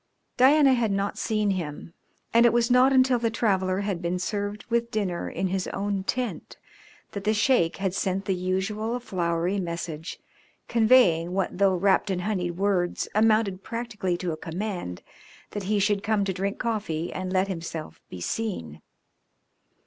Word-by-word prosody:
Diana 275 +1 +6
had 235 -3 +1
not 200 +1 -1
seen 215 -2 +1
him, 170 -3 -5 0.4
and 235 +1 +6
it - - +4
was 240 +1 +2
not 255 +2 +6
until 260 -2 +4
the 230 -1 +1
traveller 190 -4 0
had 200 -4 -2
been 175 +1 -1
served 205 +2 -3
with 235 0 0
dinner 195 -6 -2
in 190 - -2
his 185 0 -1
own 200 -1 -2
tent 250 +1 -3 0.5
that 200 - -6
the 215 +2 +2
Sheik 215 -7 +2
had 195 -2 -1
sent 195 0 -1
the 195 - +1
usual 195 +6 -2
flowery 175 -3 -1
message 170 -2 -5 0.5
conveying 220 -8 +4
what, 195 -1 -1
though 195 -2 +4
wrapped 190 +2 +2
in 185 -2 -1
honeyed 180 -4 -2
words, 190 -3 0
amounted 215 -3 +2
practically 220 -6 -3
to 175 -1 -3
a 155 - -4
command 175 - -5 0.5
that 205 -2 -5
he 210 - +2
should 200 0 +2
come 210 -1 +1
to 190 - -1
drink 195 +2 -2
coffee 205 -8 -2
and 185 0 -4
let 190 +1 +2
himself 165 -4 -6
be 90 - -8
seen. 85 - -4
195 Hz, 165 wpm, -26 LUFS, 180-220 Hz, 0.5 s, Diana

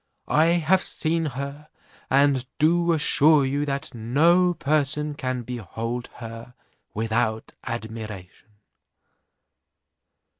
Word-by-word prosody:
I 155 +2 +4
have 175 +2 +3
seen 165 -1 -1
her, 140 +3 -6 0.4
and 135 -1 +3
do 170 +2 +3
assure 150 -2 +4
you, 140 +2 -1
that 140 0 -3
no 165 +10 +3
person 150 0 0
can 130 -3 -3
behold 120 +1 -5
her 115 +1 -9 0.4
without 110 0 -1
admiration." 110 -6 -7
140 Hz, 90 wpm, -24 LUFS, 115-155 Hz, 0.4 s, I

